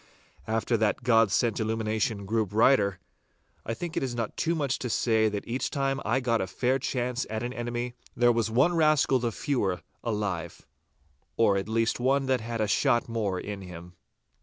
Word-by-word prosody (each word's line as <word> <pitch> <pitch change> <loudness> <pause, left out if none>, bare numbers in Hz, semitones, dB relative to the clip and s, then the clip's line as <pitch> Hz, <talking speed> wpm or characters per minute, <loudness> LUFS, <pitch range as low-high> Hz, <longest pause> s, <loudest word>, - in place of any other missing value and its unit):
After 115 +1 0
that 110 -1 0
God 115 -4 +4
sent 115 +1 +1
illumination 110 -1 -1
grew 110 +2 +1
brighter, 105 -2 +3 0.7
I 115 - -3
think 175 +3 -6
it - - 0
is 130 -2 -2
not 115 -2 -3
too 165 +1 0
much 140 -4 -1
to 125 - -3
say 110 -1 +2
that 105 -1 -5
each 125 +3 -2
time 135 -1 -1
I 130 - +1
got 120 -3 +1
a 95 - -2
fair 125 +7 0
chance 125 -1 -2
at 110 +1 -3
an 120 +1 -3
enemy, 120 0 -3 0.2
there 120 0 +4
was 115 -1 0
one 130 +10 +3
rascal 155 -4 +3
the 120 -1 -1
fewer 105 - -1 0.2
alive—or 100 - -3
at 100 +2 -2
least 115 +1 +1
one 135 +2 +2
that 130 -2 +1
had 115 0 -3
a 105 - +1
shot 120 +3 +2
the - - -11
more 105 -5 -1
in 100 -1 -6
him. 90 -1 -10
115 Hz, 185 wpm, -27 LUFS, 105-125 Hz, 0.7 s, God